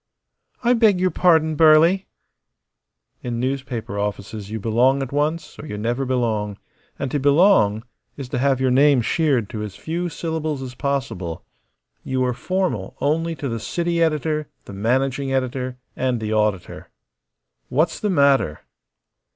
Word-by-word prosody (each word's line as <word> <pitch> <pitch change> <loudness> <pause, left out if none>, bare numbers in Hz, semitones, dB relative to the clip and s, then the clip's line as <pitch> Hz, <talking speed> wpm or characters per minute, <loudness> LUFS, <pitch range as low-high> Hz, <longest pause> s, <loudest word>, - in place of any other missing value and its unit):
"I 245 +1 +4
beg 220 -6 +4
your 185 0 +2
pardon, 160 -3 +3
Burly!" 165 +5 +5 1.1
In 120 -1 -3
newspaper 125 -5 -3
offices 100 0 -4
you 110 +1 -4
belong 125 +6 +2
at 130 - -7
once 150 +3 -2
or 155 - -8
you 105 - -5
never 120 +5 -1
belong; 110 -5 -1 0.4
and 140 -3 -3
to 145 - 0
belong 140 - +4 0.3
is 135 -3 -6
to 125 - -2
have 135 0 +2
your 130 -1 +2
name 135 -1 +4
sheared 140 - +1
to 110 - -4
as 105 -3 -6
few 175 +2 -3
syllables 155 -3 -3
as 125 -1 -7
possible. 130 - -3 0.6
You 130 -1 0
are 125 - 0
formal 180 - -2
only 165 +3 0
to 145 - -4
the 115 -2 -3
city 170 +7 -1
editor, 155 -1 0 0.2
the - - -10
managing 130 +6 0
editor, 130 -1 -2 0.2
and 130 -2 0
the 110 0 -3
auditor. 105 -4 -1 0.8
"What's 155 +6 +1
the 210 - -1
matter?" 140 - +2
135 Hz, 150 wpm, -22 LUFS, 115-155 Hz, 1.1 s, Burly